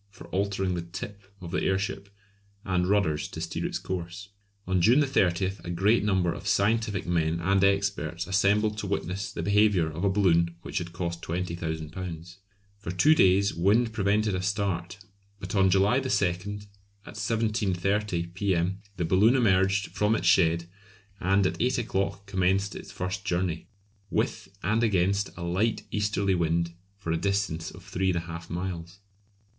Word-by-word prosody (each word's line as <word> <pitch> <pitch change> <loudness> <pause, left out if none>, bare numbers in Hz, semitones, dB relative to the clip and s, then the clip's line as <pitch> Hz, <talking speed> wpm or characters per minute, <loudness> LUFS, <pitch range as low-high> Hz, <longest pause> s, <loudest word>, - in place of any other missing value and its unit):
for 100 - -13
altering 95 -1 0
the 85 - -2
"tip" 95 +4 -8 0.2
of 85 -2 -7
the 90 - 0
airship; 95 +1 -1 0.6
and 90 -2 +1
rudders 95 -7 +1
to - - -8
steer 85 0 -3
its - - -3
course. 90 +2 -6 0.4
On 95 -1 +1
June 120 - +5
30 95 -6 +1
a - - -7
great 100 +7 +2
number 95 -5 +1
of - - -8
scientific 105 -1 +1
men 85 -1 0
and 95 +3 +2
experts 100 -3 0
assembled 105 +2 +2
to 105 - -3
witness 95 0 -3
the - - -5
behaviour 100 -6 +3
of 80 +4 -5
a 100 - +3
balloon 85 -4 +2
which - - -3
had 85 -1 -6
cost 85 -1 -4
£20,000. 85 0 -5 0.4
For 100 - -7
two 90 - +4
days 100 -6 +4
wind 110 +7 +2
prevented 105 0 +1
a 95 - -1
start, 95 -2 -2 0.4
but 95 0 -6
on 95 -2 +4
July 100 +7 +3
2, 135 - -3 1.0
at - - -10
7.30 105 -4 -1
P.M., 95 0 0 0.2
the 90 - 0
balloon 100 +9 +4
emerged 100 -4 +2
from 105 +1 +2
its 90 - -2
shed, 85 -2 +4 0.5
and 95 +1 +2
at - - -1
eight 125 +1 +2
o'clock 100 -4 -2
commenced 95 +1 +1
its - - -9
first 90 +3 -4
journey, 90 -2 -1 0.4
with - - -1 0.2
and 110 +5 +1
against 100 -1 +2
a 85 - -6
light 100 +5 0
easterly 105 -2 0
wind 85 -1 0 0.2
for 90 -5 -4
a 80 - +1
distance 100 -3 -1
of - - -13
three 95 +1 -2
and 90 - +1
a - - -1
half 85 0 -8
miles. 85 0 -5
95 Hz, 160 wpm, -27 LUFS, 85-100 Hz, 1.0 s, June